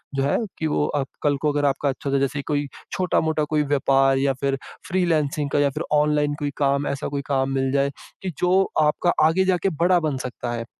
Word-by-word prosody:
जो 135 - +1
है 140 - +2 0.2
कि 160 - 0
वो 150 -1 +1
अब 140 -2 0 0.2
कल 145 -1 +2
को 150 - +2
अगर 145 0 +1
आपका 140 +1 +1
अच्छा 140 +1 -4
होता 140 0 +2
जैसे 140 +1 -1
कोई 145 -1 0 0.2
छोटा-मोटा 160 -4 +1
कोई 155 -1 +3
व्यापार 135 -1 +2
या 135 0 +2
फिर 135 -1 0 0.3
फ्रीलांसिंग 155 -5 0
का 145 - +1
या 145 -1 +3
फिर 150 +4 -4
ऑनलाइन 150 0 +2
कोई 145 -1 -2
काम 140 0 +1
ऐसा 140 +1 -3
कोई 140 -1 -3
काम 135 -1 +1
मिल 135 0 0
जाए 140 0 +2 0.3
कि, 190 - -3
जो 185 +2 +2
आपका 150 +3 +2 0.2
आगे 175 +4 +3
जाके 185 +1 +1
बड़ा 175 +2 +2
बन 155 -4 -1
सकता 125 -1 -5
है। 115 -1 -4
145 Hz, 215 wpm, -23 LUFS, 140-155 Hz, 0.3 s, कोई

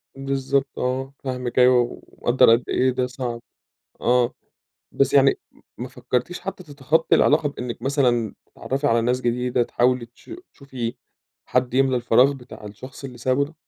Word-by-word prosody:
بالضبط 135 0 -1
آه، 130 +2 -2
فاهمِك 125 -2 -2
أيوه 125 -1 +3
ومقدر 120 -1 +3
قد 120 - -4
إيه 130 - +2
ده 125 0 -1
صعب. 125 -2 -5 0.6
آه، 120 0 +2 0.6
بس 135 -1 +1
يعني 135 -1 +5 0.4
ما - - -5
فكرتِيش 125 +8 -3
حتى 195 -1 -6
تتخطي 150 +2 +1
العلاقة 150 0 +3
بإنِك 125 -4 -6
مثلًا 125 -5 +1
تتعرفي 140 +2 -3
على 115 -3 +3
ناس 125 +2 0
جديدة، 125 0 0
تحاولي 125 0 +1
تش 120 - -20 0.2
تشوفي 130 -4 -6 0.5
حد 125 -1 0
يملى 135 -1 +3
الفراغ 125 +3 +4
بتاع 125 -5 -12
الشخص 125 +7 -11
اللي 125 -3 -8
سابه 130 +3 +1
ده؟ 150 +3 -13
130 Hz, 150 wpm, -23 LUFS, 120-135 Hz, 0.6 s, يعني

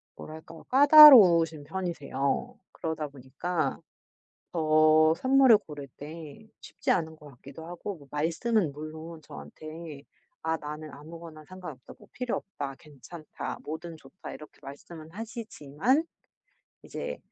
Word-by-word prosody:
뭐랄까, 160 +1 -11
까다로우신 235 - +8
편이세요. 155 -5 -3 0.2
그러다 160 -2 -4
보니까 140 +6 -4 0.7
더 155 0 +4
선물을 260 +1 +5
고를 145 -6 -10
때 160 +7 -10
쉽지 - - -3
않은 160 -2 -1
것 150 -1 -14
같기도 140 +5 -12
하고 175 +2 -7
뭐 140 -2 -17
말씀은 165 +4 0
물론 155 +2 -9
저한테 155 - -10 0.4
"아 160 0 0
나는 150 0 -8
아무거나 155 +1 -11
상관없다. 175 -8 -11
뭐 - - -18
필요없다. 195 - -5
괜찮다. 155 +2 -9
뭐든 160 +2 -7
좋다." 155 +6 -11
이렇게 150 - -13
말씀은 155 +3 -11
하시지만 225 - -2 0.8
이제 - - -6
160 Hz, 275 characters per minute, -28 LUFS, 150-180 Hz, 0.8 s, 까다로우신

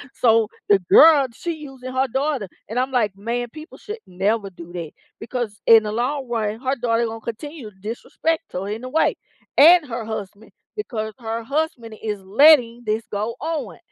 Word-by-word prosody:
So 225 -2 +4 0.2
the 200 -1 +5
girl, 285 - +7
she 340 +8 -4
using 270 -4 -9
her 260 +1 +1
daughter, 265 -4 -1 0.2
and 230 +4 -2
I'm 260 +1 0
like, 215 -6 +1
"Man, 235 +4 -3
people 310 +2 -11
should 430 +2 -7
never 195 +3 -1
do 175 -1 -12
that," 165 -4 -6 0.3
because 225 -3 -5
in 225 -1 +8
the 210 - -3
long 255 +4 -2
run, 220 -2 -2
her 265 +1 -1
daughter 235 -1 +1
gonna 225 0 -6
continue 250 +2 -7
to 190 - -24
disrespect 315 +10 -3
her 185 +2 -3
in 220 +4 -5
a 255 - -5
way 320 - +2 0.4
and 330 +1 +8
her 235 -3 -5
husband, 215 -1 -7 0.2
because 220 - -4
her 225 0 -4
husband 275 -4 -2
is 210 -2 -3
letting 240 +2 +5
this 215 +1 -1
go 215 +3 -2
on. 290 - -4
230 Hz, 180 wpm, -22 LUFS, 215-275 Hz, 0.4 s, in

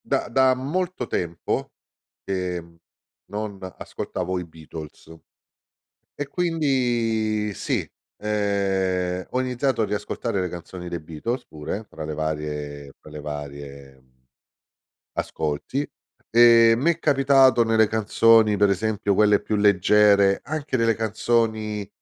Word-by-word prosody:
Da - - 0
da 130 -1 +4
molto 165 +3 -2
tempo, 85 -6 -3 0.5
ehm, 90 -3 -4 0.5
non 105 -1 -4 0.2
ascoltavo 90 +1 -4
i 90 - -4
Beatles. 80 -1 -11 1.1
E 145 - -4
quindi 120 - 0
sì, - - -2 0.3
ehm, 95 -3 -1
ho 130 - 0
iniziato 130 -1 0
a - - +2
riascoltare 105 +1 -3
le 90 - -2
canzoni 90 +1 -8
dei 85 - -4
Beatles 80 - -5
pure, 80 +7 -6
fra 80 - -8
le 75 0 -4
varie 75 -2 -4
fra 75 - -15
le 75 - -7
varie 70 -2 -8 1.1
ascolti 80 - -3 0.4
e 115 0 +7
m'è 165 +7 +1
capitato 135 -5 +4
nelle 110 -1 +3
canzoni, 110 0 +4
per 100 0 +3
esempio 100 +1 0
quelle 105 +1 +4
più 110 - -3
leggere, 100 0 +4
anche 150 -1 -3
nelle 115 -1 +2
canzoni 110 -1 -1
105 Hz, 115 wpm, -24 LUFS, 85-115 Hz, 1.1 s, e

